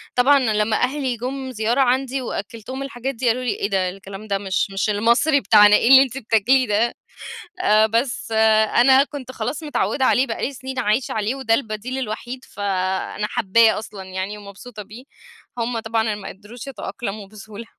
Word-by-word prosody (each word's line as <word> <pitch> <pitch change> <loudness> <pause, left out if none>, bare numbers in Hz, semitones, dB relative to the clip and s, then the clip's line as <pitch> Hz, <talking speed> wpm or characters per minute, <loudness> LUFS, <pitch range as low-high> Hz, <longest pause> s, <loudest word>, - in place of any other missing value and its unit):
طبعًا 275 +3 +5
لما 215 -3 +1
أهلي 260 -2 -1
جُم 260 +2 -5
زيارة 235 +3 0
عندي 260 +1 +1
وأكّلتهم 230 +3 -6
الحاجات 270 -1 -5
دي 245 +2 -2
قالوا 245 +2 +1
لي: 245 - -1
"إيه 200 - -3
ده؟! 190 -2 0
الكلام 195 +2 -10
ده 200 -1 0
مش 195 0 -2
مش 195 +2 -1
المصري 235 +8 +2
بتاعنا 210 +1 +6
إيه 235 - +2
اللي 270 0 +9
أنتِ 265 0 -6
بتاكليه 240 +2 +2
ده؟" 220 +3 +1 0.7
آآ 215 - +4
بس 230 +1 -2 0.4
أنا 265 +3 +6
كنت 260 -4 -9
خلاص 245 +7 -4
متعوّدة 290 -2 -1
عليه 260 +1 +3
بقى - - -5
لي 275 - -5
سنين 265 0 -7
عايشة 235 +2 0
عليه 220 +4 -1
وده 260 -4 0
البديل 230 +2 -3
الوحيد، 245 +2 -5
فأنا 190 +1 -3
حابّاه 220 +3 +3
أصلًا 210 -2 -8
يعني 190 +2 -5
ومبسوطة 205 +2 -10
بيه، 215 +6 -13 0.5
هم 235 0 -2
طبعًا 225 -1 -1
ما 205 -1 -8
قدروش 215 +6 -11
يتأقلموا 205 -5 -6
بسهولة. 215 +2 -10
230 Hz, 170 wpm, -21 LUFS, 210-260 Hz, 0.7 s, اللي